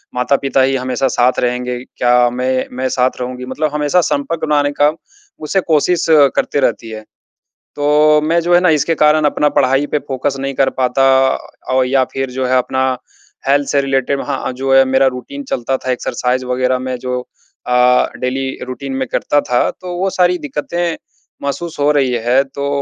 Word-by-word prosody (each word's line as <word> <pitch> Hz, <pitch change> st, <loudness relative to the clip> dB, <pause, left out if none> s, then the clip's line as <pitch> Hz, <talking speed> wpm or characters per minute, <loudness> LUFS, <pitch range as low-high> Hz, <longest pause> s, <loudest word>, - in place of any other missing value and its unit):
माता-पिता 135 Hz, +2 st, +1 dB
ही 135 Hz, +1 st, +2 dB
हमेशा 130 Hz, 0 st, -1 dB
साथ 125 Hz, 0 st, +1 dB
रहेंगे 125 Hz, 0 st, -2 dB
क्या? 125 Hz, -1 st, +2 dB
मैं 130 Hz, +1 st, -1 dB
मैं 130 Hz, 0 st, -1 dB
साथ 130 Hz, 0 st, 0 dB
रहूँगी 125 Hz, 0 st, -5 dB
मतलब 145 Hz, +4 st, -2 dB
हमेशा 150 Hz, +4 st, +2 dB
संपर्क 160 Hz, +1 st, -2 dB
बनाने 145 Hz, -1 st, +1 dB
का 145 Hz, +1 st, +5 dB, 0.6 s
उसे 195 Hz, +5 st, +1 dB
कोशिश 165 Hz, +1 st, +1 dB, 0.3 s
करती -, -, 0 dB
रहती 115 Hz, -4 st, -1 dB
है। 110 Hz, 0 st, -7 dB, 0.7 s
तो 150 Hz, +1 st, +4 dB
मैं 165 Hz, +3 st, +1 dB
जो 175 Hz, +1 st, +2 dB
है 175 Hz, -, +6 dB
ना 180 Hz, -, +3 dB
इसके 165 Hz, +3 st, 0 dB
कारण 150 Hz, 0 st, +3 dB
अपना 150 Hz, 0 st, +2 dB
पढ़ाई 135 Hz, +3 st, +2 dB
पे -, -, +3 dB
फोकस 135 Hz, +1 st, -2 dB
नहीं 135 Hz, 0 st, -3 dB
कर 135 Hz, 0 st, +2 dB
पाता 130 Hz, +1 st, +2 dB, 0.7 s
और 130 Hz, 0 st, +3 dB
या 130 Hz, 0 st, +2 dB
फिर 135 Hz, -1 st, -3 dB
जो 130 Hz, +1 st, -2 dB
है 130 Hz, +1 st, +2 dB
अपना 130 Hz, +1 st, -1 dB, 0.7 s
हेल्थ 140 Hz, +1 st, +2 dB
से 140 Hz, -, +2 dB
रिलेटेड 135 Hz, 0 st, 0 dB
वहाँ 140 Hz, -2 st, -3 dB
अ, -, -, -3 dB
जो 135 Hz, +1 st, -2 dB
है 135 Hz, 0 st, +7 dB
मेरा 130 Hz, +1 st, +2 dB
रूटीन 280 Hz, -, -8 dB
चलता 130 Hz, +2 st, -1 dB
था 130 Hz, -, -4 dB
एक्सरसाइज़ 125 Hz, +1 st, -2 dB
वगैरह 125 Hz, 0 st, 0 dB
में 130 Hz, 0 st, -4 dB
जो 125 Hz, 0 st, -3 dB, 0.5 s
अ, 125 Hz, 0 st, +3 dB
डेली 135 Hz, +1 st, -2 dB, 0.2 s
रूटीन 135 Hz, +2 st, -6 dB
में 130 Hz, 0 st, -2 dB
करता 145 Hz, -, +1 dB
था 125 Hz, -, +2 dB
तो 180 Hz, -1 st, -8 dB
वो 190 Hz, +1 st, 0 dB
सारी 180 Hz, -1 st, +2 dB
दिक्कतें 160 Hz, +3 st, -3 dB, 0.5 s
महसूस 140 Hz, +4 st, -4 dB
हो 145 Hz, +1 st, +3 dB
रही 135 Hz, -4 st, +1 dB
है। 130 Hz, +3 st, +4 dB
तो 140 Hz, +1 st, -5 dB
135 Hz, 185 wpm, -16 LUFS, 125-150 Hz, 0.7 s, है